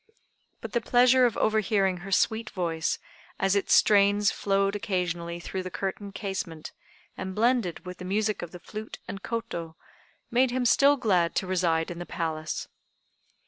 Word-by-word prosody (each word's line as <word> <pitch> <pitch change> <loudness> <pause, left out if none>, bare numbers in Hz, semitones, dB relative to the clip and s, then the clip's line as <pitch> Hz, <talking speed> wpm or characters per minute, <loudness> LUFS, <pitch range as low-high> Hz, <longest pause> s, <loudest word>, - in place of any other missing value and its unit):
But - - -6
the 235 - 0
pleasure 250 +2 +5
of 230 - -4
overhearing 200 -3 +2
her 195 +3 -9
sweet 220 +3 +1
voice, 165 -4 -1 0.4
as 195 +1 +2
its 200 - +3
strains 205 0 +4
flowed 195 0 0
occasionally 175 -4 -2
through 190 +2 -4
the 185 - -5
curtained 195 +2 -5
casement, 190 -6 -5 0.4
and 190 0 -5
blended 230 -6 +1
with 180 0 -8
the 180 - -7
music 210 +2 0
of 175 - -5
the 180 - -10
flute 215 +4 -8
and 195 - -6
koto, 225 -9 -4 0.6
made 250 +2 +3
him 250 0 -1
still 280 +4 +5
glad 185 -9 +1
to - - 0
reside 175 -3 0
in 170 - -7
the 175 - -6
Palace. 160 -2 -3
195 Hz, 160 wpm, -27 LUFS, 175-220 Hz, 0.6 s, pleasure